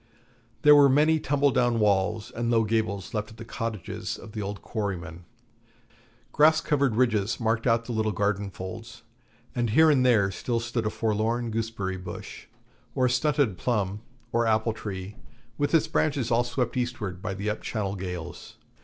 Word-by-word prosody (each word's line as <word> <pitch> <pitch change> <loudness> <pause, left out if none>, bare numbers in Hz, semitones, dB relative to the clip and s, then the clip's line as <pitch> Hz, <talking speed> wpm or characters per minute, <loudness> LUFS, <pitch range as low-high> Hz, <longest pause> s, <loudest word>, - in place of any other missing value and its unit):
There 150 0 +8
were 140 -1 +7
many 155 +4 +4
tumble 145 -1 +2
down 120 -1 +2
walls 105 +2 +1
and 120 0 -2
low 115 -1 +3
gables 110 -3 -1
left 105 -1 -2
of 110 - -14
the 115 - -8
cottages 115 -4 -4
of 110 - -11
the 105 - -5
old 100 0 -5
quarrymen; 90 -6 -4 1.1
grass 155 +2 +5
covered 140 -7 +1
ridges 110 -3 +1
marked 115 +1 0
out 115 -1 +2
the 125 - -5
little 110 -1 0
garden 100 0 -1
folds, 95 +4 -8 0.5
and 120 -1 0
here 160 +8 +6
and 135 -3 +3
there 110 -6 +4
still 115 +5 -2
stood 115 -1 -2
a - - +1
forlorn 115 +2 -1
gooseberry 110 -4 -3
bush, 90 -1 -9 0.5
or 130 - +2
a - - +3
stunted 135 - +1
plum 105 -4 -1 0.3
or 115 0 +1
apple 110 0 +2
tree 100 -2 -7 0.4
with 145 - +1
its 160 - +4
branches 145 -6 0
all 120 +1 +3
swept 120 0 -2
eastward 110 -7 -3
by 95 -1 -3
the 100 +2 -2
up 105 - -5
Channel 100 -4 -3
gales. 90 -3 -7
115 Hz, 170 wpm, -26 LUFS, 100-125 Hz, 1.1 s, There